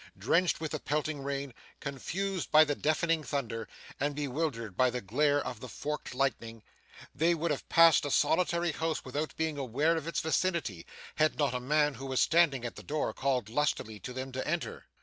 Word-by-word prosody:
Drenched 180 +1 +2
with 160 -1 -4
the 155 - -2
pelting 150 0 -2
rain, 140 -1 -3 0.3
confused 180 +7 -3
by 155 +1 +8
the 145 -2 0
deafening 155 +2 +1
thunder, 115 -6 -3 0.3
and 145 +1 0
bewildered 135 - -2
by 130 +4 +4
the 125 +1 -3
glare 145 +8 +2
of 120 - -5
the 125 - -8
forked 150 -3 -5
lightning, 115 -4 -2 0.5
they 170 +2 +2
would 165 0 -1
have 145 - -4
passed 165 -1 +6
a 145 - -2
solitary 170 +4 +2
house 160 0 -2
without 145 +4 -3
being 160 -2 -1
aware 140 +6 +1
of 160 -1 -4
its 170 - -1
vicinity, 160 - -1 0.3
had 155 0 +2
not 145 -4 +1
a 125 - -1
man, 150 +3 +2
who 135 +2 -7
was 130 -1 0
standing 155 -7 +3
at 120 - -5
the - - -7
door, 150 0 -2
called 130 -5 0
lustily 110 -4 -1
to 125 - -7
them 130 +1 -5
to 130 0 -4
enter. 170 +2 -3
145 Hz, 190 wpm, -31 LUFS, 130-160 Hz, 0.5 s, by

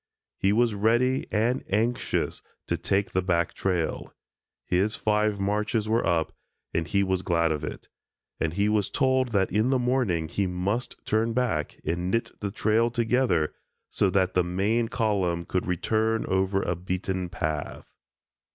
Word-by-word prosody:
He 95 - +1
was 115 +1 +3
ready 120 +5 +2
and 115 +4 +1
anxious 115 +5 0 0.2
to - - 0
take 100 +1 0
the 95 - +1
back 85 -2 0
trail. 90 -4 -2 0.5
His 95 +4 +1
five 105 -1 +1
marches 105 +2 0
were 115 +2 +2
up 85 -3 +1 0.4
and 80 0 0
he 100 -1 +2
was 95 -1 0
glad 85 -3 +1
of 75 -1 -2
it, 75 - -6 0.5
and 80 -1 0
he 100 +1 +2
was 105 -2 +1
told 130 -2 +2
that 100 -5 +1
in 110 +5 +2
the 135 - +3
morning 120 -10 +1
he 95 +4 -1
must 95 +7 -2
turn 115 +1 +1
back 110 - -1
and 85 +3 -1
knit 115 +4 0
the 100 - -2
trail 110 +3 +2
together, 115 -9 +1 0.4
so 100 - +2
that 95 -1 +1
the 90 - +3
main 100 +7 0
column 95 -7 0
could 90 - -2
return 110 +5 0
over 95 +1 +1
a 90 - -1
beaten 90 +1 -3
path. 80 -4 -4
100 Hz, 160 wpm, -26 LUFS, 90-115 Hz, 0.5 s, was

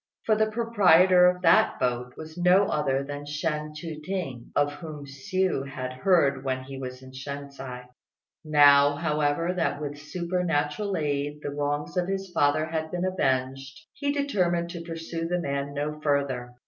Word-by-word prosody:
For 215 - +3
the 215 0 +2
proprietor 190 -6 +5
of 180 0 0
that 165 - +4
boat 125 0 -1
was 160 0 -9
no 180 +3 +4
other 140 -2 0
than 145 +1 -6
Shên 150 0 -3
Chu 155 -1 -6
t'ing, 155 -10 -5
of 145 0 +2
whom 150 -1 -8
Hsiu 180 0 -1
had 130 -1 -5
heard 140 -2 +2
when 130 -1 -2
he 135 0 -8
was 130 0 -7
in 130 - -12
Shensi; 135 -1 -7 0.6
now, 145 -2 +6
however, 150 +2 0
that 170 -5 -1
with 145 -1 -5
supernatural 170 +2 -1
aid 145 0 -2
the - - -3
wrongs 145 +4 -2
of 180 0 +1
his 195 -1 -3
father 155 -1 +2
had 160 0 -3
been 180 +2 -2
avenged, 135 -6 -1 0.2
he 285 -1 -1
determined 180 -12 0
to 170 - -6
pursue 165 0 -5
the 180 +1 0
man 140 -2 -3
no 150 +1 -3
further. 135 -5 -1
150 Hz, 160 wpm, -26 LUFS, 140-175 Hz, 0.6 s, now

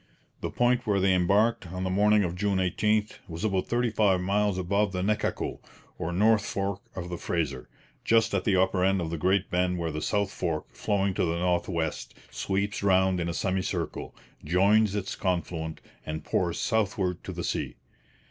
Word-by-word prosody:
The - - -3
point 125 0 +1
where 100 -2 +2
they 95 0 +3
embarked, 100 +4 +2
on 90 +2 -5
the 95 - -1
morning 105 +2 +4
of 85 -2 -2
June 100 +1 0
18, 105 +3 +2 0.2
was 85 +3 -6
about 95 -4 0
thirty 120 -1 +1
five 100 -4 +3
miles 100 +1 +1
above 100 +2 0
the 90 0 -1
Nechaco, 105 +1 -1 0.4
or 80 - -2
north 105 +4 +3
fork 100 0 -2
of 90 -1 -5
the 85 - -5
Fraser, 75 -7 -2 0.3
just 115 -1 +3
at 95 -2 +1
the 100 - +2
upper 95 0 +2
end 95 +1 +3
of 80 -2 -3
the 85 - -3
great 95 +4 +1
bend 90 0 +1
where 85 -1 -2
the 75 0 -4
south 100 +2 0
fork, 85 -6 -2
flowing 100 -2 0
to - - 0
the 85 0 -1
north 90 +1 0
west, 85 -3 -3 0.2
sweeps 95 +10 -2
round 95 -2 +3
in 85 0 -1
a - - -2
semicircle, 95 0 -2 0.3
joins 100 +5 +3
its 95 -2 -3
confluent, 85 -4 -2 0.2
and 80 0 -5
pours 85 -2 -1
southward 100 -5 0
to - - -6
the - - -5
sea. - - -2
95 Hz, 185 wpm, -27 LUFS, 90-105 Hz, 0.4 s, morning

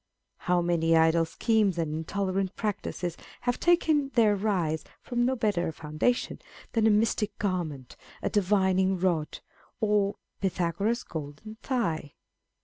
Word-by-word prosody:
How 180 -1 +3
many 165 -1 +3
idle 160 +1 +4
schemes 210 +1 +1
and 160 -3 -1
intolerant 190 +4 -2
practices 190 -5 -3 0.3
have 245 0 -1
taken 315 -5 +3
their 215 -4 +5
rise 185 -6 0 0.2
from 240 -1 0
no 260 +1 +1
better 205 -7 0
a - - -2
foundation 155 +11 -1 0.3
than 225 -2 +3
a - - +6
mystic 210 -1 +1
garment, 165 -10 -3 0.3
a - - +1
divining 190 -2 +2
rod, 175 -4 -1 0.4
or 205 -2 +2 0.3
Pythagoras^ 190 +4 -1
golden 160 +8 -7
thigh 170 - -2
190 Hz, 130 wpm, -28 LUFS, 165-220 Hz, 0.4 s, a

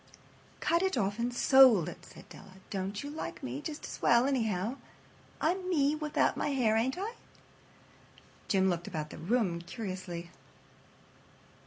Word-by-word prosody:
"Cut 340 +1 +2
it 380 -7 0
off 205 0 0
and 240 +1 0
sold 245 - +6
it," - - -8
said - - -14
Della. 195 -1 -14 0.2
"Don't 195 +2 -3
you 285 - -6
like 300 - -6
me 125 +3 -4
just 300 - -6
as - - -8
well, 235 +1 +5
anyhow? 225 -3 0 0.6
I'm 365 +3 0
me 290 -5 +3
without 305 -1 +1
my - - -1
hair, 250 -6 +2
ain't 250 +6 +1
I?" 415 +5 -3 1.3
Jim 190 -1 +3
looked 175 -2 -1
about 155 -3 -4
the - - -9
room 180 -1 0
curiously. 185 -3 -6
225 Hz, 150 wpm, -31 LUFS, 185-280 Hz, 1.3 s, sold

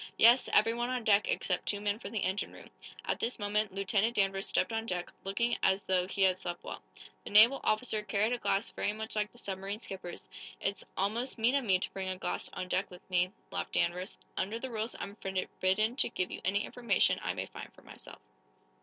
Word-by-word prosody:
"Yes; 240 +3 +6
everyone 230 +3 +3
on 255 -2 -2
deck, 205 -1 +4
except 180 -2 0
two 205 - +1
men 205 +1 -1
for - - -6
the 215 -2 -2
engine 190 +2 -1
room." - - -13 0.3
At - - -1
this 240 - -1
moment 210 0 0
Lieutenant 195 +4 +1
Danvers 195 -1 +1
stepped - - +1
on 225 0 -2
deck, 180 -2 -3
looking 235 +5 0
as 190 +1 +3
though 185 -1 +2
he 195 0 +1
had 185 -1 +4
slept 175 -2 -5
well. - - -6 0.4
The - - -7
naval 225 +6 +7
officer 215 0 +1
carried 210 +2 +1
a 245 - -2
glass 200 -1 0
very 205 - -1
much 220 +1 -6
like 210 0 0
the - - -19
submarine 195 -1 -4
skipper's. 190 -5 -7 0.3
"It's 195 0 -2
almost 225 +8 0
mean 230 +3 +3
of 280 -3 +1
me 190 -3 +4
to 185 - -3
bring 190 -1 -2
a 185 - -2
glass - - -2
on 185 - -4
deck 190 +2 0
with 180 -1 -14
me," 180 0 +2 0.2
laughed 90 -1 -3
Danvers. 180 +3 0 0.2
"Under 210 +4 -1
the 260 +2 -5
rules 220 +1 -2
I'm 200 +2 -6
forbidden 190 +3 0
to - - +4
give 180 - -2
you - - -5
any 200 +3 +1
information 245 -1 +2
I - - -2
may - - -3
find - - -10
for - - -18
myself." - - -11
205 Hz, 215 wpm, -32 LUFS, 190-225 Hz, 0.4 s, naval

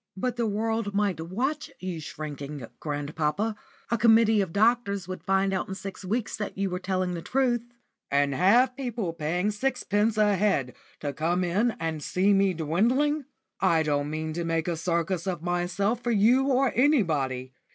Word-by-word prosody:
"But 250 +5 -1
the 235 -2 0
world 220 0 -1
might 200 -5 +1
watch 255 - -2
you 185 -2 -4
shrinking, 145 -3 -6
grandpapa. 150 +8 -2 0.4
A 235 - +1
committee 225 -1 +5
of 190 -4 -2
doctors 205 -2 +2
would 185 0 -6
find 195 0 +1
out 185 - -1
in 190 - -5
six 195 0 -7
weeks 220 +4 -2
that 210 -2 -5
you 195 -1 -1
were 180 - -2
telling 185 -1 -1
the 170 - -4
truth." 245 +2 +1 0.5
"And 140 0 +2
have 235 - +4
people 235 -10 -3
paying 175 +5 -1
sixpence 220 -2 0
a 210 -1 +4
head 160 - +1 0.3
to 145 -1 -3
come 170 +5 0
in 210 +7 +1
and 160 -2 -3
see 190 +6 +2
me 195 -2 +3
dwindling? 245 - +1 0.3
I 165 -4 +3
don't 145 -1 0
mean 155 +1 -3
to 170 +1 -2
make 165 0 -1
a 175 - 0
circus 170 +2 -1
of 175 -3 -3
myself 180 +6 0
for 240 - -1
you 235 +6 +4
or 270 -1 +2
anybody. 150 - +1
190 Hz, 170 wpm, -27 LUFS, 165-225 Hz, 0.5 s, committee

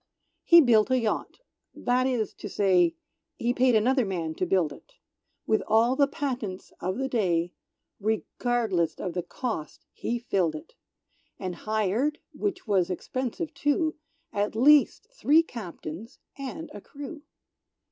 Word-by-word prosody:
He 340 0 +8
built 225 -6 +4
a 260 - +3
yacht; 230 - -2 0.3
that 250 +1 +1
is 245 -5 -1
to 205 - -8
say, 180 -4 +3 0.4
He 240 +1 0
paid 255 -1 +3
another 250 +4 +3
man 170 -6 -3
to 185 - -2
build 175 -5 +2
it; - - -17 0.5
With 220 - +2
all 230 +4 +4
the 280 0 +4
patents 245 -10 -4
of 185 +3 -2
the 270 +1 -1
day, 175 -8 0 0.5
Regardless 220 -3 0
of 180 - -4
the 180 - -1
cost, 180 - -5
he 240 - -2
filled 185 -9 0
it; 155 - -10 0.6
And 185 -2 -4
hired, 220 - 0 0.2
which 395 -2 -3
was 190 -5 +2
expensive 255 - -3
too, 310 +2 +1 0.4
At 205 +1 -1
least 290 - +5
three 325 - +4
Captains 205 - -8 0.2
and 275 +4 -6
a 205 - -8
crew. 290 - -9
225 Hz, 140 wpm, -27 LUFS, 185-265 Hz, 0.6 s, He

